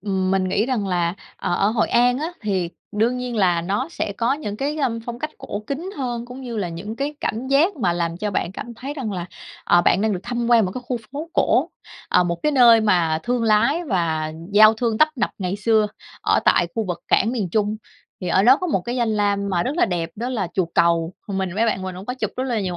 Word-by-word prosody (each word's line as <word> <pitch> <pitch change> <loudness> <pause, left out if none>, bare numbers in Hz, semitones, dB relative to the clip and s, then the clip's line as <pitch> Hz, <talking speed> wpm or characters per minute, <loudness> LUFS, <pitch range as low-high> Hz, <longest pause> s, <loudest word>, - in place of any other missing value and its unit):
ừm, 190 -1 -1
mình 190 -1 +2
nghĩ 210 +5 +1
rằng 230 -7 -1
là, 175 -1 0 0.2
ờ, - - -2
ở 200 - +2
Hội 225 - +1
An 245 +2 +3
á 325 +4 -3
thì 190 -5 -1 0.2
đương 230 +4 +1
nhiên 250 -2 -4
là 180 -4 +3
nó 205 - -1
sẽ 275 -11 -3
có 235 +3 +2
những 210 -8 -4
cái, 290 +4 -2
a, 290 - +1
ưm, 230 -1 -3
phong 240 +1 -7
cách 305 +3 -4
cổ 205 - -5
kính 325 +7 -4
hơn, 240 -3 -3
cũng 250 +2 -9
như 235 -3 -5
là 190 -4 -1
những 200 +7 -6
cái 285 +2 -2
cảm 235 +4 -2
giác 315 +7 +3
mà 185 -9 +1
làm 170 -1 -2
cho 210 +2 -2
bạn 185 -1 -2
cảm 235 +3 -7
thấy 270 +5 -6
rằng 245 -8 -4
là, 180 -1 -4 0.4
ờ, 175 0 +4
bạn 190 - +3
đang 215 0 +1
được 180 - -3
thăm 240 0 -2
quan 230 -3 +6
một 185 - -2
cái 250 - -5
khu 250 - -1 0.2
phố 315 +4 -6
cổ, - - +2 0.4
à, - - +4
một 170 -1 -1
cái 300 0 +2
nơi 235 -4 +7
mà 175 -7 +2
thương 245 -1 0
lái 250 +10 +3
và 160 - -1 0.2
giao 215 +1 +7
thương 225 -1 -1
tấp 310 - +6
nập 235 - 0
ngày 185 0 -2
xưa 215 0 +2 0.4
ở - - +3
tại - - +4
khu 225 -1 -1
vực 175 -1 -4
cảng 225 +5 +3
miền 210 -8 -2
Trung. 210 +2 0 0.4
Thì 180 - -3
ở 190 - +3
đó 255 +5 +7
có 365 - -3
một 195 - +1
cái 240 +7 -4
danh 235 -2 +1
lam 200 -1 +1
mà 175 -2 +1
rất 280 +6 -2
là - - +4
đẹp 175 -3 -2
đó 240 +3 -3
là 210 -9 -2
chùa 185 -3 +1
Cầu, 170 0 +2
mình 190 -3 -2
với 225 +2 +2
bạn 190 -4 0
mình 185 -1 -5
cũng 190 - -9
có 250 - -3
chụp - - -3
rất 255 - -1
là 240 -5 -1
nhiều 180 -2 -3
215 Hz, 260 wpm, -22 LUFS, 185-250 Hz, 0.4 s, nơi